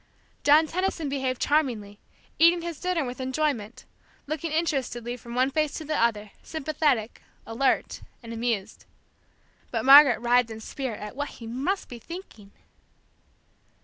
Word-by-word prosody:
John 300 +2 +6
Tenison 340 -2 -2
behaved 265 -2 -2
charmingly, 230 -9 0 0.4
eating 335 +1 +5
his 340 -3 -5
dinner 360 -5 -1
with 250 +1 -6
enjoyment, 260 -5 -2 0.4
looking 310 +2 -4
interestedly 260 -7 -1
from 235 0 -10
one 260 +2 +2
face 305 -1 0
to 315 - -6
the 305 +1 -2
other, 215 -5 0
sympathetic, 300 -7 -1 0.2
alert, 245 +4 0 0.2
and 230 0 -7
amused. 225 -4 -3 0.8
But 230 0 -2
Margaret 275 -2 +9
writhed 240 0 +3
in 220 0 -7
spirit 240 0 -5
at 210 +3 -7
what 290 +1 -3
he 230 - -11
must 270 - -2
be 240 - -9
thinking. 230 - -10
260 Hz, 140 wpm, -26 LUFS, 230-310 Hz, 0.8 s, Margaret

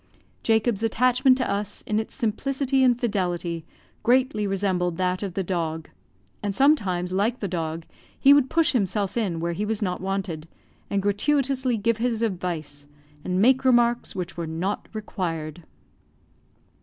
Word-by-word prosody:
Jacob's 220 -1 +1
attachment 250 +3 +3
to 255 - 0
us, 200 +1 -3
in 215 0 0
its 220 - -5
simplicity 265 +3 0
and 245 -2 +4
fidelity, 175 -7 -1 0.4
greatly 245 -4 +2
resembled 185 -3 0
that 185 0 0
of 195 -4 -4
the 195 - 0
dog; 165 -3 -3 0.5
and 205 -2 -2
sometimes, 190 - +2
like 215 +6 +1
the 200 - -2
dog, 165 -2 -3 0.3
he 275 - +7
would 285 -2 +4
push 330 -1 +3
himself 200 -4 0
in 195 -8 -1
where 170 +1 -1
he 200 - -3
was 215 0 -1
not 180 -2 -2
wanted, 190 -5 -3 0.4
and 200 -1 0
gratuitously 260 +4 +1
give 225 +2 +1
his 230 -1 0
advice, 165 -8 -3 0.4
and 185 0 -1
make 260 +2 +4
remarks 240 -3 +3
which 180 -2 -4
were 170 -1 -4
not 170 +6 -3
required. 170 -7 -4
205 Hz, 150 wpm, -25 LUFS, 180-240 Hz, 0.5 s, he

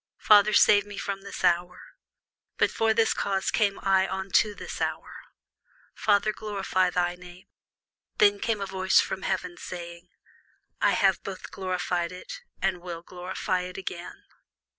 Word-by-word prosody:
Father, 210 0 +5
save 205 -1 +6
me 205 0 -10
from 195 0 -4
this 200 -1 -8
hour: 175 0 +1 0.8
but - - +2
for 225 0 +1
this 225 0 +3
cause 195 -1 -1
came 205 -3 +1
I 190 -1 +2
unto 190 +2 +1
this - - -7
hour. - - -4 0.7
Father, 210 0 +2
glorify 195 -3 -1
thy 175 0 0
name. 180 0 -14 0.7
Then 205 -1 +4
came 225 0 0
there 200 - -4
a 190 - -10
voice 190 0 +3
from 190 - -1
heaven, 185 -2 -3
saying, 170 0 -8 0.7
I - - +4
have 190 -2 +2
both 190 -1 -8
glorified 180 -2 -2
it, - - -9 0.2
and 190 -2 0
will 170 -2 -7
glorify 180 +1 -3
it 180 0 -7
again. 180 -2 -7
190 Hz, 150 wpm, -27 LUFS, 180-200 Hz, 0.8 s, save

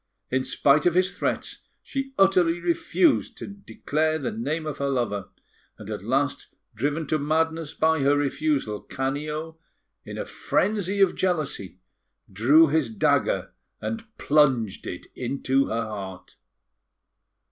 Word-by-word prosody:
In 130 0 +1
spite 145 +4 +3
of 175 - +2
his 185 +1 +2
threats, - - -2 0.2
she 270 0 -4
utterly 180 -3 +4
refused 175 - +1
to - - -6
declare 160 -6 -2
the 160 - -3
name 165 -8 -3
of 150 -2 -5
her 140 0 0
lover; 120 -7 -1 0.5
and - - -8
at - - -5
last, - - 0 0.3
driven 145 +7 -1
to 155 +2 0
madness 160 +1 0
by 160 0 +2
her 140 +1 +3
refusal, 140 -6 0
Canio, 150 +4 -4 0.4
in - - -8
a - - -3
frenzy 200 -2 0
of 195 - +4
jealousy, 155 - -2 0.6
drew 140 +11 +6
his 150 -4 +1
dagger 110 -3 +1 0.3
and 225 0 -4
plunged 135 -9 +2
it - - -6
into 135 +2 0
her 115 +1 -1
heart. 100 -4 -7
150 Hz, 135 wpm, -25 LUFS, 135-165 Hz, 0.6 s, drew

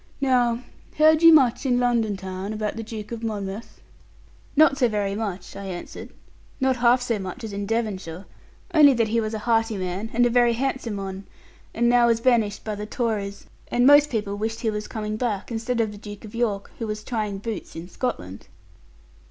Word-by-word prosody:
Now 245 -3 +2 0.4
heard 310 +1 +5
you 330 0 +9
much 265 -7 +4
in 250 -3 +2
London 235 -4 +1
town 190 +2 -5
about 215 -1 -3
the 225 - -4
Duke 215 -1 -7
of 230 -1 -5
Monmouth?' 210 -1 -5 0.8
'Not 305 -1 +6
so 250 - +4
very 205 -3 -1
much,' 200 -4 -5
I 200 - -7
answered; 180 -2 -7 0.5
'not 265 -1 +2
half 245 +1 +4
so 230 -4 -1
much 190 +6 -7
as 215 -2 -6
in 200 0 -4
Devonshire: 200 -6 -3 0.5
only 290 -4 +7
that 230 -2 +1
he 230 +1 +1
was 215 0 -3
a 210 - -6
hearty 225 -2 +1
man, 185 +4 -3
and 245 +1 +3
a - - +3
very 240 -1 +4
handsome 245 -3 -2
one, 195 0 -6 0.5
and 235 +1 +1
now 240 0 +5
was 230 -1 +3
banished 230 -4 +1
by 215 - -3
the 210 0 -6
Tories; 210 -5 -3 0.2
and 245 +1 +2
most 290 +1 +7
people 210 -3 -2
wished 220 +2 -3
he 225 -3 0
was 210 0 -4
coming 215 -1 -4
back, 220 -3 -2
instead 230 +2 -2
of 220 -2 +1
the 205 - -11
Duke 205 0 -9
of 210 - -11
York, 220 -4 -2
who 225 - -3
was 215 0 -4
trying 215 -4 -3
boots 215 +1 -6
in 165 +2 -7
Scotland.' 135 - -5
225 Hz, 200 wpm, -24 LUFS, 205-240 Hz, 0.8 s, you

